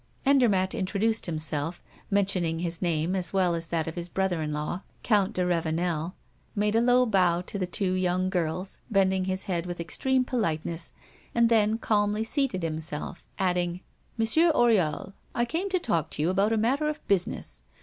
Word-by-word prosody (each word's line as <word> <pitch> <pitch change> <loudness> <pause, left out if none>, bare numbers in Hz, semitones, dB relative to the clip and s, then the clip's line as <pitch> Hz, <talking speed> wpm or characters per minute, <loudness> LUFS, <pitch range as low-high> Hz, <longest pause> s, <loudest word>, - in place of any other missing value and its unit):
Andermatt 225 -9 +3
introduced 215 +3 0
himself, 155 0 -2 0.3
mentioning 190 -5 +1
his 170 0 -2
name 170 0 0
as 180 -2 -2
well 185 -3 +3
as 165 0 -1
that 165 -2 -1
of 160 - -4
his 175 0 -5
brother 190 -2 0
in 150 -1 -2
law, 150 +5 -3 0.2
Count 210 -2 +2
de 180 -2 0
Ravenel, 170 0 -1 0.4
made 210 0 +1
a 225 - +4
low 250 +1 +4
bow 180 -6 +3
to 195 +2 -5
the 185 - -1
two 185 0 0
young 185 0 +1
girls, 180 +2 -2
bending 190 -3 +2
his 190 0 -2
head 175 -2 -2
with 175 -1 -5
extreme 255 +10 0
politeness, 165 - -2 0.4
and 235 0 +4
then 220 -1 +3
calmly 210 -1 +1
seated 225 - -1
himself, 160 0 -4
adding: 180 -1 0 0.4
"Monsieur 315 +10 +4
Oriol, 195 - +2 0.2
I 240 - +2
came 335 +10 -2
to 375 - +2
talk 170 - -1
to 150 - -3
you 170 - +2
about 200 +3 +2
a 225 - +2
matter 270 +8 +1
of 305 - -6
business. 195 -3 -1
185 Hz, 175 wpm, -27 LUFS, 170-220 Hz, 0.4 s, a